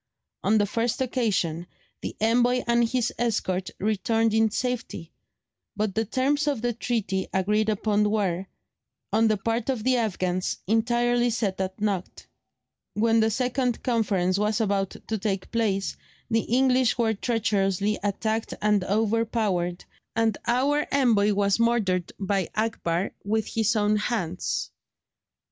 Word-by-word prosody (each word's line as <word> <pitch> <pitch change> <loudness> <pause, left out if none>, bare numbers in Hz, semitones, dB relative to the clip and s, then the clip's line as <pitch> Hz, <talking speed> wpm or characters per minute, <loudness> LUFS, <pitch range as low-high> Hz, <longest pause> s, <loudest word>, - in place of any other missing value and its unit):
On 215 +2 +3
the 205 - +3
first 230 +3 -1
occasion 205 -10 -1 0.3
the - - -5
envoy 245 +3 +2
and 235 -1 +2
his 245 -1 0
escort 195 -6 -1
returned 220 +2 +1
in 220 0 +3
safety, 230 -8 -4 0.6
but 210 -2 -1
the 225 +2 0
terms 280 +6 0
of 275 -6 -1
the 240 0 +1
treaty 215 -5 -2
agreed 210 +3 +1
upon 210 0 +1
were, 195 -3 -1 0.7
on 225 +1 +4
the 215 -1 +2
part 225 +4 -2
of 250 -5 -1
the 255 +1 +3
Afghans, 185 -5 -1
entirely 240 +3 +2
set 205 -5 -1
at 190 +1 -4
naught. 200 -4 -3 0.7
When 225 +1 +3
the 220 0 +3
second 250 +1 -1
conference 200 -6 +1
was 210 +2 +1
about 200 -3 +1 0.2
to 220 -1 -2
take 195 -2 -2
place, 205 -4 0 0.4
the 225 0 +2
English 255 0 +3
were 225 -2 +2
treacherously 205 -2 0
attacked 220 +2 -2
and 210 -2 +2
overpowered, 210 -4 0 0.3
and 225 -2 +2
our 275 +5 +2
envoy 225 -7 +3
was 200 +1 +1
murdered 210 -7 +1
by 195 -2 -1
Akbar 205 -5 -1
with 215 +1 0
his 225 0 0
own 210 0 +2
hands. 210 +1 -2
220 Hz, 135 wpm, -26 LUFS, 195-235 Hz, 0.7 s, on